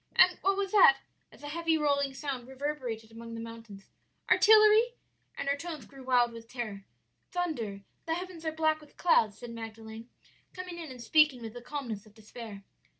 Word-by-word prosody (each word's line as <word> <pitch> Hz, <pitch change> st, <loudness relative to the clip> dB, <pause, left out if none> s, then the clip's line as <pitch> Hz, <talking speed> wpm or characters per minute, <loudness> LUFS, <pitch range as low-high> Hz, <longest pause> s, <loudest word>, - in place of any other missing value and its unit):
and 365 Hz, -1 st, +6 dB
what 390 Hz, 0 st, +2 dB
was 395 Hz, -1 st, -1 dB
that?' 370 Hz, -10 st, +7 dB, 0.3 s
as -, -, -17 dB
a -, -, -6 dB
heavy, 330 Hz, +1 st, +1 dB
rolling 280 Hz, -2 st, +1 dB
sound 270 Hz, -3 st, -5 dB
reverberated 260 Hz, -5 st, -4 dB
among 230 Hz, 0 st, -9 dB
the -, -, -6 dB
mountains; 230 Hz, -3 st, -10 dB, 0.4 s
'artillery?' 435 Hz, +2 st, +6 dB, 0.4 s
and -, -, -4 dB
her 280 Hz, -, +2 dB
tones 310 Hz, -4 st, -7 dB
grew 275 Hz, +3 st, -14 dB
wild 245 Hz, -2 st, +3 dB
with 230 Hz, 0 st, -11 dB
terror. 215 Hz, -6 st, -6 dB, 0.5 s
"'Thunder; 245 Hz, -, -3 dB, 0.3 s
the 325 Hz, -, +1 dB
heavens 360 Hz, -2 st, -7 dB
are 315 Hz, -, -1 dB
black 315 Hz, 0 st, +1 dB
with 300 Hz, -, -18 dB
clouds,' 220 Hz, -, +3 dB
said 240 Hz, 0 st, -8 dB
Magdalen, 225 Hz, 0 st, -8 dB, 0.4 s
coming 365 Hz, -2 st, -7 dB
in 325 Hz, -3 st, -7 dB
and 250 Hz, -2 st, -9 dB
speaking 305 Hz, 0 st, +4 dB
with 225 Hz, -1 st, -6 dB
the 245 Hz, -, -8 dB
calmness 235 Hz, -6 st, -5 dB
of 210 Hz, -, -20 dB
despair. 215 Hz, -2 st, -10 dB
265 Hz, 180 wpm, -30 LUFS, 230-320 Hz, 0.5 s, that